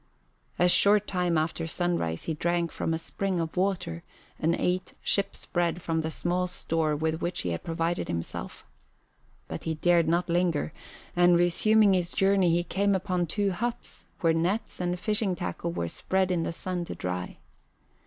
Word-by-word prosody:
A 180 - +4
short 205 +3 +5
time 180 -4 0
after 160 +1 -1
sunrise 165 - -1
he 165 - -2
drank 170 +1 0
from - - -2
a 160 - +1
spring 185 +2 -2
of 165 -1 -3
water 180 - -1 0.4
and 165 +2 +2
ate 180 +1 -1
ship's 200 0 0
bread 175 -1 -1
from 160 -1 0
the 160 - -2
small 180 +2 -1
store 160 -3 -1
with 160 +2 -1
which 175 - -1
he 90 - -1
had 85 - -4
provided 165 +1 -1
himself. 85 -1 -5 0.8
But - - -6
he 160 -1 -1
dared 170 0 +3
not 170 +2 +2
linger, 170 - +1 0.4
and 175 0 +5
resuming 200 +4 +4
his 180 -1 +1
journey 195 -2 +3
he 170 +1 +2
came 200 +2 +1
upon 180 -2 0
two 200 +4 0
huts 235 +6 -4 0.2
where 165 -1 +4
nets 175 +7 -1
and 180 0 -1
fishing 210 -2 +1
tackle 90 - -3
were 85 0 -2
spread 190 - 0
in 175 -2 +1
the 165 - -2
sun 180 +1 -3
to - - -6
dry. 90 0 -4
175 Hz, 175 wpm, -28 LUFS, 160-185 Hz, 0.8 s, short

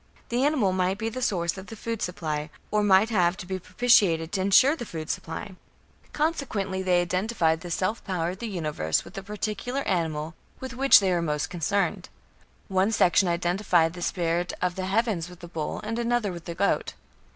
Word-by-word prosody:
The 245 +2 +1
animal 270 -11 +2
might 185 +1 0
be 220 +1 -2
the 255 +3 -6
source 175 -5 0
of 190 - -10
the 225 - -8
food 230 0 -4
supply, 155 -4 -3 0.2
or 210 - +2
might 205 +2 +4
have 180 -3 +2
to 205 - -7
be 190 0 -4
propitiated 185 -5 +3
to 195 - -1
ensure 205 +10 +5
the 285 - -6
food 160 -7 -5
supply. 170 +4 -6 0.6
Consequently 230 - -1
they 180 -2 +3
identified 175 -3 0
the 175 - -7
self 185 +6 -1
power 175 -3 -1
of 185 - -9
the 235 - -4
Universe 150 - -1
with - - -12
the 195 - -5
particular 210 +6 -3
animal 160 - -1 0.3
with 260 -1 -6
which 265 -3 +6
they 190 -2 +1
were 175 -1 +1
most 150 0 -2
concerned. 190 +3 -1 0.6
One 190 +2 +2
section 190 -2 +4
identified 175 -1 +2
the 180 - -8
spirit 175 0 -1
of 180 -1 0
the 185 +1 -4
heavens 195 -4 0
with 180 -1 -13
the 175 - -9
bull 160 -3 -4
and 225 +2 -3
another 235 -3 0
with 170 -2 -9
the 170 - -5
goat. 200 +3 0
190 Hz, 195 wpm, -26 LUFS, 170-215 Hz, 0.6 s, which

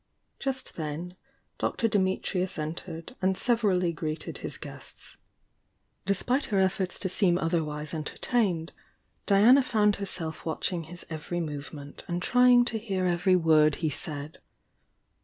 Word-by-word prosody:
Just 265 -1 -3
then 165 +3 -4 0.4
Dr. 230 - 0
Dimitrius 190 -2 0
entered 165 +5 -5
and 190 0 +2
severally 200 -8 +2
greeted 155 0 -4
his - - -5
guests. - - -9 0.9
Despite 245 +8 +1
her 205 - -1
efforts 190 -1 +1
to 190 - -2
seem 185 -1 +3
otherwise 155 -3 -2
enter 155 -2 -4
tained, 185 -9 0 0.6
Diana 220 +7 +7
found 210 -5 +2
herself 170 -5 -4
watching 165 +1 -2
his 175 +2 -11
every 160 +2 -3
movement 145 -2 -6
and 175 0 -1
trying 245 +4 +5
to 225 -2 -2
hear 195 -4 -2
every 180 +1 +3
word 155 -3 +4
he 160 -3 -1
said. 150 0 -4
180 Hz, 130 wpm, -28 LUFS, 160-200 Hz, 0.9 s, Diana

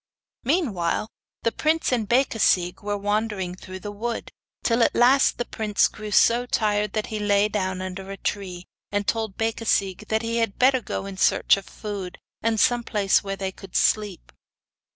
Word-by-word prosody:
Meanwhile, 220 - 0 0.3
the 230 - +2
prince 315 +3 +1
and 225 -5 0
Becasigue 225 -8 +2
were 205 0 -2
wandering 205 -2 -1
through 185 +1 -9
the 205 - -5
wood, 230 +3 -4 0.3
till 235 0 +2
at - - +3
last 255 +3 +4
the 240 - -2
prince 215 -3 +1
grew 215 0 -8
so 235 +4 +4
tired, 210 -3 0
that 215 -1 -1
he 215 - -2
lay 205 0 +3
down 190 -3 -2
under 190 +1 -6
a 195 - -6
tree, 185 -4 -4 0.3
and 205 0 -1
told 220 -4 -1
Becasigue 215 -3 0
that 220 +1 0
he 230 0 -1
had 225 -4 0
better 260 0 +4
go 195 - -4
in 195 -1 -7
search - - +4
of 195 - -8
food, 200 -4 -6 0.2
and 225 0 +1
of 215 - +1
some 240 -1 +3
place 205 -4 +2
where 195 0 -3
they 195 -1 -3
could 190 -1 -13
sleep. 210 -4 +1
210 Hz, 180 wpm, -24 LUFS, 195-230 Hz, 0.3 s, last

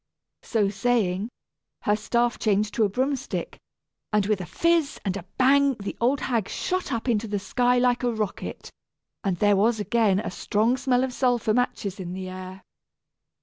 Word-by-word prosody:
So 215 -4 +1
saying, 205 -2 0 0.5
her 205 - +3
staff 235 +3 0
changed 210 0 +1
to 225 - +2
a - - 0
broom 260 +7 0
stick, - - -5 0.5
and 210 -2 +2
with 210 -2 0
a 175 - -6
fizz 335 -3 +1
and 190 -1 0
a 190 -3 -6
bang 275 +1 +4
the 200 -2 -6
old 255 +4 +2
hag 230 -6 -1
shot 370 -4 -2
up 230 0 -2
into 225 -2 +1
the 205 0 -1
sky 245 +5 +1
like 245 0 +2
a 245 -1 +1
rocket. 215 -3 -4 0.5
And 195 -4 0
there 205 +2 +4
was 220 +3 +2
again 210 -3 +2
a 215 - -4
strong 220 +6 +1
smell 260 -1 +1
of 260 -1 -2
sulphur 245 -4 +1
matches 215 -5 -1
in 180 -1 -5
the 185 0 -5
air! 185 +1 -8
220 Hz, 180 wpm, -25 LUFS, 200-250 Hz, 0.5 s, bang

